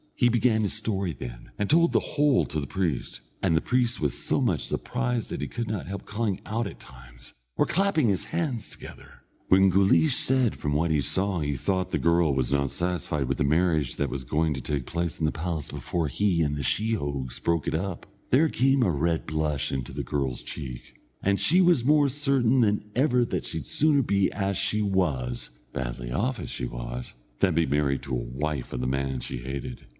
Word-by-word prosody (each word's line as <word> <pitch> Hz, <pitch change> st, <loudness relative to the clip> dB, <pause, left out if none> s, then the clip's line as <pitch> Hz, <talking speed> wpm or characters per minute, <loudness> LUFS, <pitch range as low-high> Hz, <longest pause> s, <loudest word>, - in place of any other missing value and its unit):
He 120 Hz, -, +4 dB
began 120 Hz, -1 st, +3 dB
his 100 Hz, -, +1 dB
story 100 Hz, -5 st, -1 dB
then, -, -, -9 dB
and 105 Hz, -, 0 dB
told 170 Hz, +5 st, +4 dB
the -, -, +5 dB
whole 145 Hz, -3 st, +2 dB
to 80 Hz, -, -3 dB
the 70 Hz, -, -4 dB
priest, 80 Hz, -9 st, -2 dB, 0.2 s
and 80 Hz, -, +2 dB
the -, -, +2 dB
priest 125 Hz, -1 st, +1 dB
was 75 Hz, -, 0 dB
so -, -, 0 dB
much -, -, +1 dB
surprised 125 Hz, -2 st, -2 dB
that -, -, -3 dB
he -, -, -2 dB
could 120 Hz, -1 st, -4 dB
not 105 Hz, -5 st, -3 dB
help 100 Hz, +1 st, -6 dB
calling 105 Hz, -3 st, -2 dB
out 115 Hz, +1 st, -1 dB
at -, -, -10 dB
times, -, -, -13 dB, 0.2 s
or -, -, +3 dB
clapping 185 Hz, -7 st, +2 dB
his 95 Hz, -3 st, 0 dB
hands 155 Hz, -9 st, -2 dB
together. -, -, -12 dB, 0.3 s
When 95 Hz, +1 st, +6 dB
Guleesh 100 Hz, -, +4 dB
said 130 Hz, -4 st, +3 dB
from 75 Hz, -, -2 dB
what 80 Hz, +3 st, +1 dB
he 75 Hz, -2 st, +2 dB
saw 95 Hz, +7 st, 0 dB
he 75 Hz, -2 st, -1 dB
thought 95 Hz, +6 st, -1 dB
the -, -, 0 dB
girl 85 Hz, -4 st, +3 dB
was 65 Hz, 0 st, 0 dB
not 70 Hz, -1 st, +1 dB
satisfied 85 Hz, -6 st, -2 dB
with 70 Hz, -, -2 dB
the -, -, +3 dB
marriage 75 Hz, -3 st, +2 dB
that 70 Hz, -, -1 dB
was 70 Hz, -, -4 dB
going 80 Hz, +4 st, 0 dB
to 65 Hz, -, -5 dB
take 70 Hz, 0 st, -2 dB
place 85 Hz, 0 st, -3 dB
in 80 Hz, -, +1 dB
the 75 Hz, -, +2 dB
palace 80 Hz, -2 st, -4 dB
before 85 Hz, -3 st, -2 dB
he 85 Hz, +3 st, +1 dB
and 75 Hz, -1 st, 0 dB
the 75 Hz, -, -3 dB
sheehogues 70 Hz, -, -1 dB
broke 85 Hz, -3 st, 0 dB
it -, -, 0 dB
up, 90 Hz, +1 st, -3 dB, 0.2 s
there 155 Hz, +5 st, +4 dB
came 135 Hz, +1 st, +3 dB
a 95 Hz, -, +2 dB
red 80 Hz, +2 st, 0 dB
blush 75 Hz, -2 st, -1 dB
into 65 Hz, -2 st, -3 dB
the 70 Hz, +2 st, -4 dB
girl's 65 Hz, 0 st, -2 dB
cheek, 65 Hz, -5 st, -8 dB, 0.2 s
and 100 Hz, 0 st, +2 dB
he 180 Hz, +4 st, +4 dB
was 170 Hz, -9 st, +4 dB
more 145 Hz, 0 st, +5 dB
certain 135 Hz, -3 st, +2 dB
than 105 Hz, -2 st, +2 dB
ever 125 Hz, -2 st, +3 dB
that -, -, -3 dB
she -, -, -4 dB
had 70 Hz, -, -9 dB
sooner 145 Hz, -2 st, +3 dB
be 100 Hz, -3 st, +2 dB
as 100 Hz, -1 st, -1 dB
she 105 Hz, +4 st, 0 dB
was 75 Hz, -12 st, -1 dB, 0.2 s
badly -, -, -4 dB
off 120 Hz, -, -1 dB
as -, -, -5 dB
she -, -, -3 dB
was -, -, -6 dB, 0.3 s
than 90 Hz, -4 st, +3 dB
be 85 Hz, 0 st, +3 dB
the 70 Hz, -, 0 dB
married 70 Hz, -2 st, 0 dB
wife 65 Hz, +3 st, -3 dB
of 60 Hz, -, -3 dB
the 65 Hz, -, -1 dB
man 65 Hz, 0 st, -1 dB
she -, -, -4 dB
hated. 65 Hz, 0 st, -6 dB
85 Hz, 210 wpm, -26 LUFS, 70-115 Hz, 0.3 s, When